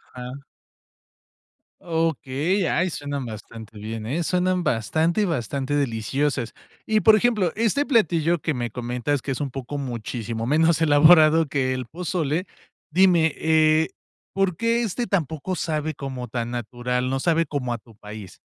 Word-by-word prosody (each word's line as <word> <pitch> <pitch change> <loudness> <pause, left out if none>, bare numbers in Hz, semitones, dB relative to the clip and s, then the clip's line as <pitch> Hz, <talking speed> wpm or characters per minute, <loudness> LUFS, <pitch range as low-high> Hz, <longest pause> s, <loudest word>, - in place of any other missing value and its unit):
Ah. 125 +3 -8 1.4
Okey, 165 +2 0
ay, 180 +1 +1
suenan 145 -3 -4
bastante 110 0 -9
bien, 110 +1 -6
¿eh? 155 +9 -1
Suenan 180 +1 +1
bastante, 160 - +1
bastante 140 - -2
deliciosas. 135 0 -1 0.3
Y, 215 -1 +2
por 220 - +7
ejemplo, 215 -6 +2
este 230 +6 +1
platillo 175 - +2
que 155 0 -1
me 120 -2 -3
comentas, 125 +3 -2
que 135 - -4
es 135 - -3
un 140 -3 -3
poco 135 +2 -5
muchísimo 115 -3 -4
menos 160 +4 +3
elaborado 155 +1 +6
que 130 -2 0
el 130 -1 -4
pozole, 170 +1 -2 0.4
dime, 170 -2 +4
eh, 160 0 +3 0.4
¿por 195 -3 +1
qué 230 +5 +1
este 230 +3 -2
tampoco 165 -1 -1
sabe 155 -2 -2
como 130 -3 -6
tan 120 0 -3
natural, 125 +1 -2
no 135 - -1
sabe 165 +2 +2
como 135 -4 -3
a 120 - -3
tu 115 -4 -20
país? 105 -2 -10
145 Hz, 145 wpm, -23 LUFS, 125-170 Hz, 1.4 s, por